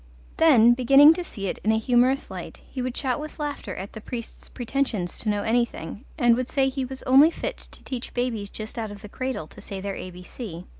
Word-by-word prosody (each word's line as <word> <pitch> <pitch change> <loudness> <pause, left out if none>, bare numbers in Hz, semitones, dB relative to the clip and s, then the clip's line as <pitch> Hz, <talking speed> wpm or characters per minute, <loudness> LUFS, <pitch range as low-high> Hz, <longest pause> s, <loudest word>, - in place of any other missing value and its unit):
Then, 240 -8 +7
beginning 275 +5 +7
to 355 - -4
see 200 -12 -6
it 190 - -3
in 215 - +1
a 220 - +3
humorous 250 +4 +2
light, - - -8
he 260 - -5
would 250 0 -3
shout 260 -1 0
with 305 +1 -8
laughter 295 -1 -4
at 195 +2 -7
the 220 - -8
priest's 235 0 -8
pretentions 240 -7 -2
to 220 - -2
know 205 -1 0
anything, 230 - -1
and 240 -1 +5
would 255 +1 -2
say 270 -2 +2
he 265 0 -3
was 265 +1 -7
only 275 +5 +7
fit - - -4
to - - -16
teach 255 -2 -5
babies 235 -5 -1
just 215 +3 -7
out 220 -1 -3
of 205 +1 -10
the 210 - -9
cradle 255 -8 -3
to - - -14
say 195 - -6
their 200 +1 -4
ABC. 180 0 -8
240 Hz, 220 wpm, -25 LUFS, 210-265 Hz, -, Then